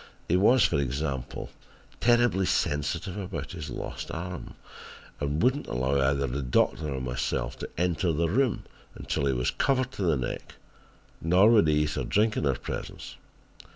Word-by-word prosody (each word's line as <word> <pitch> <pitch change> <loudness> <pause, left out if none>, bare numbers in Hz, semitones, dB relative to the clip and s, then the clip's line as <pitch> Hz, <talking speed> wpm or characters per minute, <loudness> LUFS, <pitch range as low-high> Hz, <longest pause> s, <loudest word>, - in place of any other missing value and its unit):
He 90 - +2
was, 110 +6 +5
for - - +1
example, 70 -1 -3 0.5
terribly 120 -6 +3
sensitive 80 +6 -1
about 85 -7 -5
his 80 -4 -6
lost - - -6
arm 90 +1 -6 0.6
and 70 +2 -1
would 125 +2 +4
not 145 - -8
allow 65 +3 0
either 70 +1 +2
the 70 +2 -3
doctor 70 +4 +1
or 65 - -2
my 65 -1 -4
self 65 - -2
to - - -5
enter 90 0 +1
the 80 +2 +1
room 125 +6 +1 0.3
until 70 - -2
he 70 - +2
was 60 -1 0
covered 130 -2 +1
to - - -7
the 85 -6 +2
neck, 65 - -5 0.7
nor 90 +7 +5
would 105 -8 +5
he 75 0 +3
eat 75 - -3
or - - -1
drink 110 +1 +2
in 75 - 0
our 70 - +2
presence. - - -6
80 Hz, 175 wpm, -27 LUFS, 70-95 Hz, 0.7 s, was